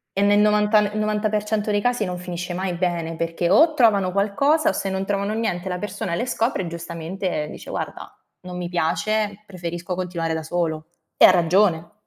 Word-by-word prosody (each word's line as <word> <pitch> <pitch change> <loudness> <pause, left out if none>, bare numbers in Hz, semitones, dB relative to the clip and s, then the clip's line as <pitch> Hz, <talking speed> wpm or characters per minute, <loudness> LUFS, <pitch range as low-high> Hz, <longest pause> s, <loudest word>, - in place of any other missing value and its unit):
E 195 - +1
nel 205 0 +4
novanta 210 0 +4
n 205 -1 0
novanta 215 0 0
per 210 0 0
cento 210 0 -1
dei 205 - +1
casi 245 -1 +1
non 180 -1 -4
finisce 175 0 -5
mai 185 0 -2
bene, 170 -2 -2
perché 165 +1 -1
o 315 - +5
trovano 205 -8 +3
qualcosa 245 - +2
o, - - +2
se 195 0 -3
non 190 0 -2
trovano 200 +1 -1
niente, 190 -5 -2
la 180 0 -3
persona 205 -2 -4
le 240 +9 -1
scopre 230 -4 0
e 180 - -4
giustamente 170 0 -4
dice: - - -9
“Guarda, - - -6 0.3
non 180 0 -8
mi 175 -1 -4
piace, 205 +4 -1
preferisco 175 -1 -5
continuare 170 -3 -2
da 160 - -4
solo;” 160 -1 -2 0.3
e - - +8
ha - - +9
ragione. 175 -1 +2
185 Hz, 200 wpm, -22 LUFS, 175-210 Hz, 0.3 s, ha